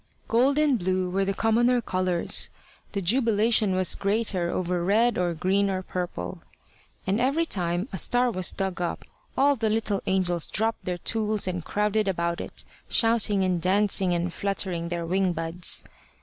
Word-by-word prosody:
Gold 260 +5 +3
and 295 -5 +3
blue 185 0 -1
were 195 +1 +1
the 195 - 0
commoner 240 +3 +2
colours: 185 -5 0 0.4
the 200 -2 -2
jubilation 220 -1 +2
was 185 -1 +2
greater 200 -4 0
over 180 -1 -1
red 225 +6 +3
or 175 -2 0
green 195 +4 +1
or 185 -1 -2
purple. 175 - -5 0.6
And 195 +4 0
every 280 +6 +2
time 175 - -1
a 190 - -2
star 245 +5 +2
was 185 -4 +1
dug 190 -2 -3
up 175 - -3 0.3
all 285 +1 +4
the 225 -3 -1
little 215 -2 0
angels 180 -3 +1
dropped 225 +2 -1
their 180 -1 -2
tools 215 +1 0
and 180 -2 -3
crowded 210 +2 0
about 170 -2 -1
it, - - -7 0.3
shouting 225 -4 +3
and 180 -2 0
dancing 190 0 +2
and 175 0 -1
fluttering 185 -4 -2
their 170 -1 -3
wing 185 +1 +1
buds. 165 +2 -3
195 Hz, 165 wpm, -26 LUFS, 180-220 Hz, 0.6 s, all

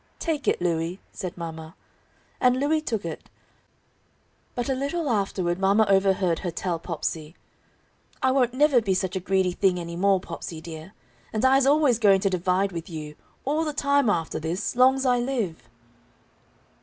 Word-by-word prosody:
"Take 310 -4 -3
it, - - +2
Louie," 170 +1 -1
said 180 -3 -6
mama. 160 -1 -7 0.6
And 250 0 +3
Louie 305 +3 +1
took 225 - -3
it. 165 -2 -7 1.3
But 245 - -2
a 270 - +1
little 285 +5 -2
afterward 195 -6 0
mama 200 +3 +4
overheard 195 -3 +2
her 180 - -3
tell 170 0 -3
Popsey: 160 -1 -4 0.8
"I 260 - +2
won't 255 -2 +1
never 280 -3 +4
be 195 -3 0
such 185 0 -2
a - - 0
greedy 190 0 +1
thing 180 0 +1
any 170 0 -6
more, 195 +2 +3
Popsey, 165 -2 -7
dear. 160 +3 -9 0.4
And 220 +3 0
I's 265 +1 +4
always 285 -5 +4
going 200 -4 +5
to 195 - +1
divide 185 +2 +1
with 170 -1 -6
you, 155 -2 -7 0.3
all 300 +4 +1
the 305 -2 -3
time 280 -3 +2
after 165 -5 -1
this, 165 +8 -3
long's 265 +2 +4
I 250 -1 +3
live!" 210 - -3
195 Hz, 165 wpm, -25 LUFS, 170-255 Hz, 1.3 s, going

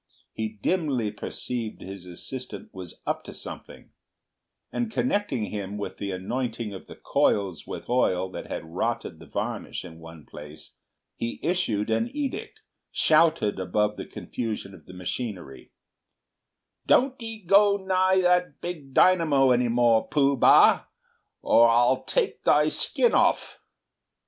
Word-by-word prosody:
He 110 0 -3
dimly 140 - 0
perceived 115 +2 -5
his 95 -1 -9
assistant 105 +4 -8
was 90 -3 -10
"up - - -2
to - - -9
something," - - -10 0.8
and 235 -2 -2
connecting 205 - -1
him 100 -1 -5
with 105 - -6
the 100 - -3
anointing 115 +3 -3
of 95 - -10
the - - -11
coils 95 -6 0
with - - -7
oil 95 -7 +1
that - - -7
had - - -5
rotted 80 - -3
the - - -13
varnish - - -4
in 80 -1 -11
one 80 -2 -12
place, 75 +1 -11 0.4
he 115 - -4
issued 115 - 0
an 230 - +1
edict, 290 -2 -4 0.3
shouted 155 -11 +3
above 105 +3 0
the - - -7
confusion 110 -4 -5
of - - -16
the - - -11
machinery, 90 - -6 1.2
"Don't 260 0 +3
'ee 225 -1 -6
go 200 +2 +5
nigh 190 -1 +2
that 180 0 +2
big 155 -7 -7
dynamo 155 -8 +4
any 125 0 +3
more, 115 -1 +3
Pooh 140 -2 +2
bah, 125 - +6 0.6
or 115 +1 +6
a'll 120 +3 +3
take - - -1
thy 150 +1 +4
skin 475 - +2
off!" - - +1
120 Hz, 140 wpm, -26 LUFS, -, 1.2 s, bah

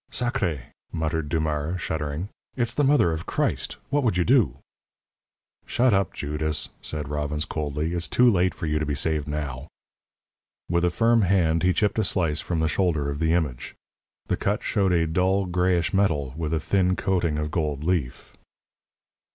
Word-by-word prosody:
"Sacré!" 110 - -1 0.3
muttered 80 -2 -2
Dumars, 80 +2 -1
shuddering. 80 +2 -3 0.3
"It 125 - +1
is 115 0 -1
the 145 - +1
Mother 135 - +4
of 80 0 -4
Christ. - - -1
What 145 +1 +2
would 110 -7 +1
you 90 - +3
do?" 110 - +3 1.1
"Shut 125 -1 +3
up, 95 0 +2
Judas!" 75 +1 -1
said 75 -2 -4
Robbins, 75 +1 -2
coldly. 75 +2 -3
"It's 85 -1 -1
too 125 - +4
late 95 -5 +3
for - - -5
you 75 0 0
to 75 - -1
be 75 - -1
saved 75 0 -1
now." 75 -2 -4 1.0
With 85 0 +1
a 90 - +4
firm 115 +6 +3
hand, 85 -4 +2
he 90 - +3
chipped 105 +4 +1
a - - +3
slice 85 -6 0
from 85 -3 -2
the 80 - +2
shoulder 80 -4 0
of 70 - -5
the 80 0 +2
image. 75 -8 -2 0.5
The - - -1
cut - - -1
showed 95 -2 +1
a 85 -2 +3
dull, 95 +4 +1
grayish 90 0 +1
metal, 75 -10 +1
with 80 -1 -3
a 80 - +1
thin 95 +3 +1
coating 85 -6 0
of 75 0 -2
gold 75 -3 -1
leaf. 80 -8 -2
80 Hz, 175 wpm, -25 LUFS, 75-95 Hz, 1.1 s, Mother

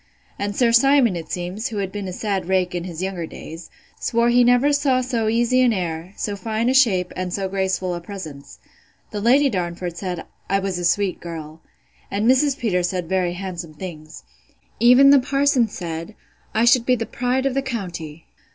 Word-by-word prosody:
And 205 0 -2
Sir 240 0 +3
Simon, 245 -3 +4
it 165 -2 -7
seems, 180 +7 -3
who 225 - -6
has 195 -2 -2
been 205 -1 -5
a - - -4
sad 195 -1 -2
rake 185 -1 +1
in 175 -1 -3
his 175 -1 -5
younger 185 -4 -3
days, 165 +2 -10 0.3
swore 235 0 +1
he 245 +1 +5
never 245 +4 +4
saw 280 -3 +2
so 245 -3 -1
easy 240 +3 +2
an 250 -2 +4
air, 175 -1 -4
so 205 - -3
fine 220 +3 -1
a - - +2
shape, 200 -10 +3
and 185 -1 -3
so 195 +1 -2
graceful 190 -1 -1
a 175 - -5
presence.—The 180 +3 -10
Lady 265 +6 +4
Darnford 175 -5 -3
said, 180 -2 -4 0.2
I 195 - +3
was 195 -2 -2
a 175 - -2
sweet 195 +1 +1
girl. 160 -2 -8 0.5
And 205 +3 -1
Mrs. 265 +2 +3
Peters 180 -8 0
said 180 -2 -3
very 180 -1 0
handsome 175 -4 -6
things. 155 -2 -9 0.6
Even 250 +4 +7
the 280 - +7
parson 275 -2 +2
said, 170 0 -6 0.4
I 225 - +2
should 240 0 +4
be 255 - +4
the 230 -1 -3
pride 250 +3 -1
of 275 - +1
the 275 - 0
county. 175 - -6
195 Hz, 190 wpm, -22 LUFS, 175-240 Hz, 0.6 s, Even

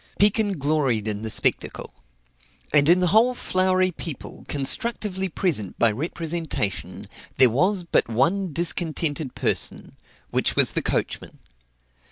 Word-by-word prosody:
Pekin 205 -1 +2
gloried 140 -7 0
in 105 -1 -2
the 110 - -4
spectacle; - - -1 0.8
and 145 0 +4
in 180 +2 +5
the 180 - +2
whole 240 +3 +4
flowery 185 -3 +1
people, 160 -3 -7
constructively 190 - 0
present 150 - -1
by 115 -2 +3
representation, 160 - -4 0.3
there 130 -2 +6
was 185 - +1
but 170 -7 +1
one 170 - +1
discontented 160 -3 -2
person, - - -1 0.4
which - - +1
was - - +4
the - - -1
coachman. - - -3
165 Hz, 125 wpm, -23 LUFS, 135-185 Hz, 0.8 s, there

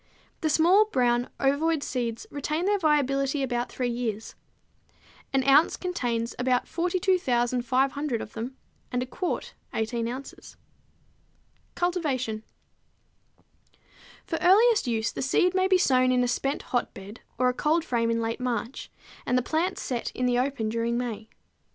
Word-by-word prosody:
The 315 - 0
small, 350 +7 +5
brown, 245 - +1
ovoid 285 +3 +1
seeds 235 -3 -3
retain 300 +4 -2
their 410 0 +2
viability 275 -3 +1
about 245 -2 -2
three 250 -1 -2
years. 225 -3 -3 1.0
An 270 -1 +2
ounce 285 +4 +5
contains 240 -10 -2
about 250 0 +1
42,500 270 - 0
of 210 - -8
them, 250 +4 -6 0.3
and 250 0 0
a - - -5
quart 355 +8 -4 0.2
18 230 +1 -1
ounces. 260 +3 -8 1.2
Cultivation. 275 -11 -1 1.8
For 325 - -3
earliest 425 - +5
use 225 -2 0
the - - -5
seed 355 +7 +2
may 375 0 +2
be 380 -1 +4
sown 255 -7 +3
in 250 0 +3
a - - +1
spent 270 +4 -1
hotbed 210 -3 -3 0.2
or 255 +1 +3
a 250 - +2
cold 315 +5 +1
frame 230 -4 0
in 230 0 +1
late 225 +2 -2
March, 245 0 -3 0.4
and 250 - +2
the 250 - +1
plants 335 +7 -1
set 245 -4 -2
in 250 - -1
the 245 0 +2
open 255 -4 -1
during 230 +1 -1
May. 230 -3 -4
255 Hz, 145 wpm, -27 LUFS, 240-315 Hz, 1.8 s, small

